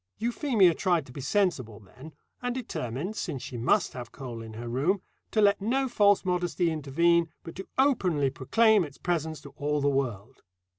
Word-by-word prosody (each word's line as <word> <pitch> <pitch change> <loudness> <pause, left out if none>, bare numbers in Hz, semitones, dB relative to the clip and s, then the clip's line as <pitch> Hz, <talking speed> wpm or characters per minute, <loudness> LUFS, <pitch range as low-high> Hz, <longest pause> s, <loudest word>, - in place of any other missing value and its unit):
Euphemia 230 - +3
tried 170 -2 +1
to 125 - -13
be 140 - -7
sensible 135 - 0
then, 130 +10 -13 0.3
and 245 0 -2
determined, 180 - -4
since 135 - -4
she 125 - -7
must 120 +1 +1
have 120 -2 -7
coal 125 -3 -7
in 110 -1 -9
her 120 +2 -7
room, 145 +12 +1 0.3
to 220 - 0
let 200 -1 +4
no 265 +6 +1
false 205 -5 +3
modesty 175 -1 0
intervene, 165 +3 +2
but 165 - -8
to 190 - -7
openly 180 - +2
proclaim 215 - +3
its 145 -4 -9
presence 160 -3 -2
to 145 - -11
all 150 0 0
the 145 - +1
world. 130 -3 -3
160 Hz, 180 wpm, -28 LUFS, 130-200 Hz, 0.3 s, let